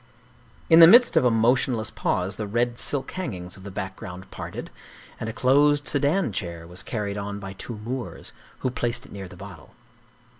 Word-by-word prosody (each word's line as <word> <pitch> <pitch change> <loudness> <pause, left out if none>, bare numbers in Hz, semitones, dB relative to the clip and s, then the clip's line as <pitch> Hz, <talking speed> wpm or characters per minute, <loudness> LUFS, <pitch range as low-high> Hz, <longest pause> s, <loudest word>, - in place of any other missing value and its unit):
In 165 - +7
the 165 - +11
midst 240 +7 +7
of - - +5
a - - +6
motionless 115 0 +1
pause 90 +3 -1
the 105 - -4
red 120 +3 0
silk 140 -2 0
hangings 95 - -5
of 95 - -14
the 100 - -8
background 95 -2 -7
parted, - - -7 0.5
and 110 - -4
a - - -2
closed 145 +5 +3
sedan 145 - +2
chair 85 -3 -5
was 90 +2 -4
carried 105 -2 -3
on 100 0 -5
by 95 -1 -7
two 110 +4 -8
Moors, 120 +4 -6 0.3
who 130 - 0
placed 120 -1 -2
it - - -16
near 100 -2 -7
the - - -13
bottle. - - -12
115 Hz, 185 wpm, -25 LUFS, 95-130 Hz, 0.5 s, the